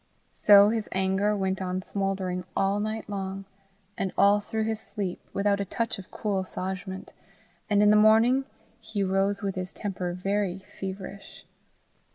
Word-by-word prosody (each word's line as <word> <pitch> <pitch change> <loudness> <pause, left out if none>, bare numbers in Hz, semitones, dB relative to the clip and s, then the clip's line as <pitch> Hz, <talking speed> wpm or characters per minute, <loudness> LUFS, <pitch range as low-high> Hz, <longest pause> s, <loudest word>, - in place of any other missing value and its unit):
So 205 0 +7
his 220 -1 -2
anger 190 +2 +1
went 190 -1 -1
on 185 0 -2
smouldering 190 -2 -2
all 195 +1 +2
night 215 +1 -3
long, 195 -1 -4 0.5
and 190 - -2
all 200 +1 +5
through 220 +1 -3
his 220 0 -1
sleep, 200 -4 -4
without 200 0 +1
a - - +1
touch 230 +2 -2
of 190 - -11
cool 205 -3 -2
assuagement, 190 0 -5 0.6
and 205 0 +4
in 210 - +6
the - - +6
morning 225 +5 +5 0.3
he 220 -3 -3
rose 195 +2 0
with 195 -1 -1
his 185 0 -4
temper 180 -3 -3
very 195 0 -1 0.2
feverish. 195 +1 -7
200 Hz, 155 wpm, -27 LUFS, 190-210 Hz, 0.6 s, So